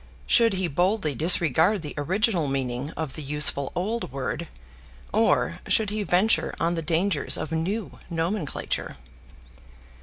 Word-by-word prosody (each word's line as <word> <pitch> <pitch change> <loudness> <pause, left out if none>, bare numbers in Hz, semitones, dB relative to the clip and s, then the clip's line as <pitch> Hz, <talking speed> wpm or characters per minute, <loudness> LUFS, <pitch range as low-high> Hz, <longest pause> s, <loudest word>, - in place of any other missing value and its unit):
Should 230 -3 +4
he 185 -1 0
boldly 175 +1 0
disregard 165 +4 +3
the 150 - -6
original 180 +2 0
meaning 135 0 -2
of 155 -4 -4
the 155 - -6
useful 145 -1 +3
old 210 - -2
word; 135 +5 -4 0.7
or 85 - +2
should 215 -2 +1
he 215 0 -2
venture 200 +2 +1
on 170 +1 +1
the 165 - -2
dangers 170 +5 +1
of 155 - -5
new 185 +7 -3
nomenclature? 165 - -3
165 Hz, 130 wpm, -25 LUFS, 150-200 Hz, 0.7 s, Should